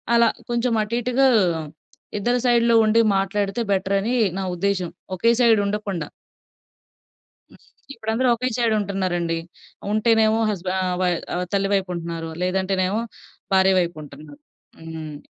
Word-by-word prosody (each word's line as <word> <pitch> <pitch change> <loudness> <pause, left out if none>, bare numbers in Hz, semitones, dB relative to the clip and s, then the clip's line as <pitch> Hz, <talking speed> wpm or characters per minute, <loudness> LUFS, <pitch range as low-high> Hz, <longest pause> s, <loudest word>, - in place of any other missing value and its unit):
అలా 235 -1 +5 0.2
కొంచెం 240 0 0
అటు 215 +2 -4
ఇటుగా 250 +3 +2 0.9
ఇద్దరి 240 +4 +1
సైడ్‌లో 235 -1 +4
ఉండి, 220 +2 +4 0.2
మాట్లాడితే 195 +3 -1
బెటరని 195 +5 0 0.2
నా - - -2
ఉద్దేశ్యం 185 -1 -1 0.3
ఒకే 230 +6 +3
సైడ్ 230 -3 +5
ఉండకుండా. 200 -6 -3 1.4
హ్మ్. - - -18 0.3
ఇప్పుడు 220 -4 -7
అందరూ 250 +2 +2
ఒకే 255 +2 -2
సైడ్ 235 -2 +2
ఉంటన్నారండి. 180 -4 -1 0.5
ఉంటేనేమో 220 0 +3
హస్బె 185 -3 -3
ఆహ్, 180 -1 -1
వయ్ 180 -1 +2 0.2
ఆహ్, 180 +1 -2
తల్లి 195 0 +1
వైపు 195 -2 0
ఉంటున్నారు. 165 -1 -5
లేదంటేనేమో 190 +2 0 0.5
భార్య 190 0 +5
వైపు 175 -1 -1
ఉంటున్నారు. 145 0 -13 0.4
హ్మ్. 160 -2 -7
195 Hz, 130 wpm, -22 LUFS, 180-225 Hz, 1.4 s, అలా